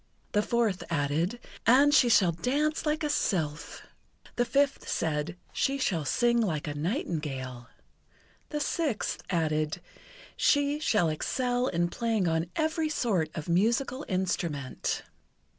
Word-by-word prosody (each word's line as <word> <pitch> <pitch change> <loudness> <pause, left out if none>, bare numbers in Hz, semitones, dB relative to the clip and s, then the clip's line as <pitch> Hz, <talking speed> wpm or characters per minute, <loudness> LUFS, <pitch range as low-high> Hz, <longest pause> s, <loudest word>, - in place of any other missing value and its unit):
The 210 - +3
fourth 225 -4 0
added: 165 +7 0 0.3
"And 280 +5 +6
she 255 -5 +6
shall 190 -6 +5
dance 290 - -1
like 305 +1 0
a - - +1
sylph." 160 - -1 0.5
The 240 - +2
fifth 275 +4 +1
said: 160 +1 -1 0.2
"She 275 +1 +1
shall 170 - 0
sing 235 - +2
like 160 -9 -1
a 145 - -2
nightingale." 145 - -3 0.8
The 300 - -2
sixth 295 -5 -1
added: 155 -2 0 0.6
"She 285 0 +2
shall 210 - +2
excel 245 - 0
in 175 -4 +1
playing 225 -2 0
on 165 +1 0
every 315 0 0
sort 200 - 0
of 155 - -5
musical 235 - +1
instrument." 170 -7 -2
200 Hz, 125 wpm, -29 LUFS, 160-260 Hz, 0.8 s, And